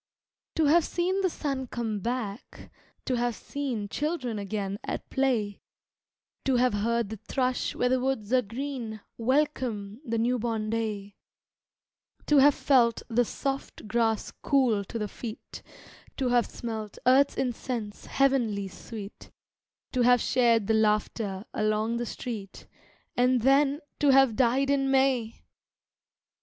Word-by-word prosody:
To 320 - +3
have 325 +3 +5
seen 370 +4 0
the 375 - +2
sun 275 -5 -3
come 225 -3 -3
back, 230 -1 -5 0.3
to 255 - 0
have 240 -1 0
seen 255 -7 -4
Children 260 -3 -2
again 200 0 -3
at - - -4
play, 235 -7 0 0.8
To 265 - +2
have 250 -1 +3
heard 230 +1 0
the 220 - -6
thrush 255 +4 -1
where 250 - +1
the 255 0 +2
woods 255 -4 -2
are 255 - +5
green 235 -1 -5 0.2
Welcome 245 -5 0
the 230 -4 -2
new 240 +2 +1
born 220 -2 -2
day, 210 -3 -3 1.1
To 295 -1 +5
have 285 +1 +6
felt 240 -5 +3
the 240 +1 +3
soft 270 -1 -4
grass 225 -1 0
cool 245 -7 +2
to 230 - -5
the 210 -2 -2
feet, 220 +2 -8 0.6
To 260 -2 0
have 245 -1 +3
smelt 220 -3 -6
earth's 265 +3 +4
incense, 240 -4 -3
heavenly 235 -8 +1
sweet, 205 +1 -9 0.6
To 255 - 0
have 245 0 +5
shared 235 -3 +3
the 220 - +1
laughter 210 -2 0
along 215 +2 0
the 240 0 -3
street, 215 -6 -6 0.5
And, 250 0 +3
then, 275 +3 +4 0.2
to 290 - +3
have 270 -4 +5
died 265 +3 +2
in 270 -1 +2
May! 265 -4 +1
240 Hz, 140 wpm, -28 LUFS, 215-265 Hz, 1.1 s, have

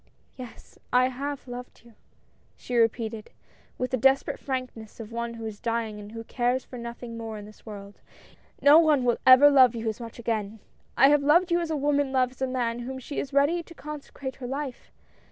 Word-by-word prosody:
"Yes, 250 -2 -12
I 250 +1 +4
have 280 +2 -5
loved 245 -1 -9
you," 235 - -17 0.6
she 250 - -6
repeated, 225 -1 0 0.5
with 255 - -3
the 255 - +1
desperate 270 +3 +2
frankness 255 -5 -5
of 225 0 -8
one 235 0 -4
who 225 -1 -7
is 215 -2 -6
dying 230 -3 -2
and 205 +1 -10
who 225 0 -6
cares 245 +2 -1
for 250 - -9
nothing 235 0 -7
more 225 -1 -6
in 205 - -9
this 215 +2 -16
world. 200 -1 -10 0.6
"No 290 +3 +8
one 305 -5 +3
will 240 -1 +1
ever 265 +3 +9
love 255 -4 +6
you 225 0 -4
as 220 - -2
much 230 -2 -9
again. 225 -3 -3 0.4
I 270 +3 +7
have 295 0 +4
loved 340 +5 +3
you 345 - +3
as 340 -2 -3
a 315 - -1
woman 285 -1 +1
loves 255 -1 0
the 265 - -1
man 240 -2 -2
to - - -6
whom 265 +1 -5
she 260 +3 -5
is 275 - -4
ready 285 +5 +2
to 335 0 -15
consecrate 285 -3 -8
her 250 - -6
life. 270 -1 -6
250 Hz, 210 wpm, -26 LUFS, 230-275 Hz, 0.6 s, ever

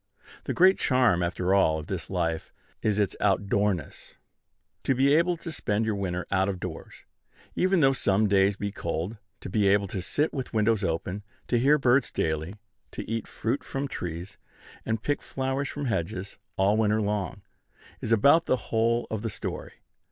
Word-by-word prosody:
The - - -1
great 185 +2 +5
charm, 125 -9 +3
after 90 +2 0
all, 80 -5 +4
of 80 - -6
this 90 -2 -5
life, 85 -3 -2 0.3
is 105 -2 +1
its 100 -2 +1
outdoorness. 100 -2 0 0.7
To 135 - +2
be 135 +3 +4
able 170 +2 +3
to 165 - -7
spend 110 -7 -1
your 110 - 0
winter 90 -3 -2
out 95 0 +2
of 95 -2 -3
doors, - - -8 0.5
even 185 -1 +3
though 135 -1 +5
some 105 -4 +2
days 100 0 +3
be 100 0 -3
cold; 85 +3 -3 0.2
to - - -7
be 100 +2 +2
able 100 +1 +4
to 95 - -3
sit 150 - 0
with 130 -3 -5
windows 110 -1 +2
open; 90 +3 -2 0.3
to 120 - +3
hear 140 +5 +5
birds 130 0 +3
daily; 80 +4 -2 0.4
to - - -6
eat 115 -1 -3
fruit 120 +6 -2
from 140 0 -3
trees, 90 -4 -6 0.5
and 110 -1 -1
pick 145 - 0
flowers 135 +1 -2
from 145 -1 -4
hedges, 95 -4 -3 0.2
all 100 +3 +3
winter 110 -1 +2
long, 105 -4 -2 0.6
is - - -3
about 140 +9 +5
the 130 - +3
whole 115 +1 +2
of 110 -2 -2
the 115 - -2
story. - - -6
105 Hz, 175 wpm, -27 LUFS, 95-130 Hz, 0.7 s, great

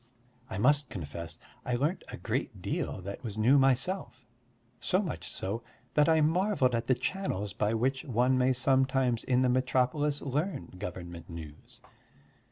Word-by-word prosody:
I - - -4
must 145 +6 +3
confess 85 -2 -6 0.3
I 125 - -1
learnt 150 +9 0
a - - -7
great - - -3
deal 95 - -3
that 100 +6 -6
was 110 -3 -5
new 125 +6 +5
myself, 135 +1 +1 0.5
so 185 - +1
much 190 -6 -3
so 100 +5 -3 0.3
that 150 +1 +4
I 160 -1 +5
marvelled 165 -4 +2
at 115 +1 -1
the 130 - +4
channels 115 - -2
by 105 +2 0
which 130 +4 0
one 125 +1 +2
may 130 +1 +3
sometimes 130 -1 +2
in 125 0 +2
the - - +4
metropolis 130 +3 +1
learn 145 +3 -2
government 85 -3 -7
news. 80 -3 -10
130 Hz, 155 wpm, -30 LUFS, 110-145 Hz, 0.5 s, new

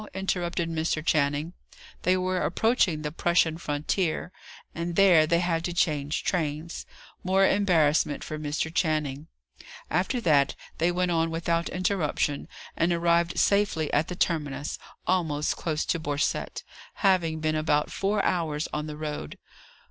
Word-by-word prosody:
interrupted 175 -3 -1
Mr. 160 -1 -1
Channing. 150 +1 +1 0.5
They 185 +1 +3
were 185 0 -1
approaching 185 -6 +1
the 150 - -3
Prussian 165 0 +1
frontier; 160 +3 -1 0.4
and 170 +1 -4
there 175 -5 +6
they 170 +2 +2
had 165 -2 0
to 175 - -2
change 150 -3 0
trains: 160 -2 -2 0.4
more 190 +1 +3
embarrassment 160 -8 +2
for 155 - -5
Mr. 150 +2 -2
Channing. 155 -4 -1 0.6
After 185 - +1
that, 145 - +3 0.2
they 170 +2 +3
went 180 0 0
on 165 -1 +1
without 170 +1 -1
interruption, 180 -6 -1 0.3
and 170 +1 +1
arrived 170 0 +2
safely 200 -7 +2
at 150 +2 +2
the 180 - -5
terminus, 150 -5 -1 0.3
almost 160 -5 0
close 155 -2 -2
to 165 - 0
Borcette, 145 -1 -2 0.4
having 170 -5 +3
been 155 0 0
about 150 -1 +1
four 200 +1 0
hours 160 -4 0
on 150 +1 -2
the 150 -1 -6
road. 150 - -5
165 Hz, 140 wpm, -27 LUFS, 150-180 Hz, 0.6 s, there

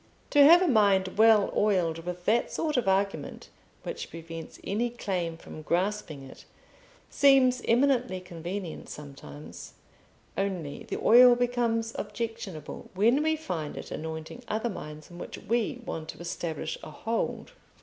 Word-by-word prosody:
To 290 -1 +7
have 340 +5 +8
a - - +2
mind 200 - +4
well 220 -2 +5
oiled 180 -6 +2
with 180 0 -5
that 235 +2 +2
sort 310 -2 -1
of 250 -5 +1
argument 195 +1 -1 0.3
which 475 -1 -5
prevents 165 -1 -9
any 225 +5 -1
claim 180 -8 -3
from 155 - -10
grasping 175 -3 -1
it, 135 - -13 0.7
seems 265 -3 +5
eminently 245 -4 +2
convenient 175 0 -6
sometimes: 80 - -10 0.6
only 185 -7 -3
the - - -2
oil 245 +1 +8
becomes 240 -2 0
objectionable 225 -9 -6
when 230 +9 +4
we 315 +1 +2
find 175 - -5
it - - -8
anointing 160 +9 -6
other 220 +2 -1
minds 150 -2 -9
on 175 - -10
which - - -7
we 240 +2 -1
want 160 -1 -5
to - - -7
establish 170 -2 -4
a - - -9
hold. 225 +9 -3
200 Hz, 140 wpm, -28 LUFS, 165-240 Hz, 0.7 s, have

